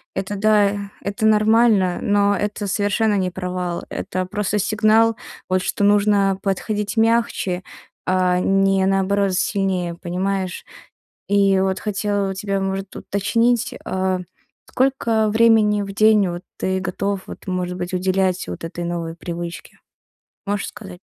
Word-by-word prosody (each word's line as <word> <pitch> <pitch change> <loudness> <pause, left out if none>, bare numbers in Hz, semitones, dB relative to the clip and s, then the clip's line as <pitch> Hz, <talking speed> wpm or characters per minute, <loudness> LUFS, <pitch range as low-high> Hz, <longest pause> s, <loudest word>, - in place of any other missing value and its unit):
Это 200 +1 -3
да, 205 -1 +2
это 200 +2 -2
нормально, 215 -3 +4
но 205 0 +2
это 205 0 -3
совершенно 205 +2 +1
не 185 -1 0
провал. 180 -1 -4
Это 185 0 -3
просто 210 +2 -2
сигнал, 215 +2 +3 0.3
вот, 185 0 +2
что - - -1
нужно 200 -1 +3
подходить 205 +2 -2
мягче, 225 -5 +1 0.4
а 185 -1 +2
не, 195 0 +2
наоборот, 195 0 +1
сильнее, 185 -3 -1
понимаешь? 185 +1 -3 0.7
И 200 -1 +3
вот 190 0 0
хотела 205 -1 -1
у - - -4
тебя, 195 0 -2
может, 195 0 -3
уточнить, 230 +4 0
а, 185 -1 -1 0.5
сколько 235 -5 +1
времени 220 -1 +4
в 195 0 -6
день 215 -1 +4
вот 175 +1 -5
ты 190 0 -1
готов 195 0 -2
вот, - - -10
может 180 -1 -2
быть, 180 0 -5
уделять 185 0 0
вот 90 - -6
этой 165 +1 -5
новой 170 -1 -3
привычке? 170 0 -7 0.7
Можешь 205 0 -2
сказать? 190 -4 -11
195 Hz, 135 wpm, -21 LUFS, 185-210 Hz, 0.7 s, нормально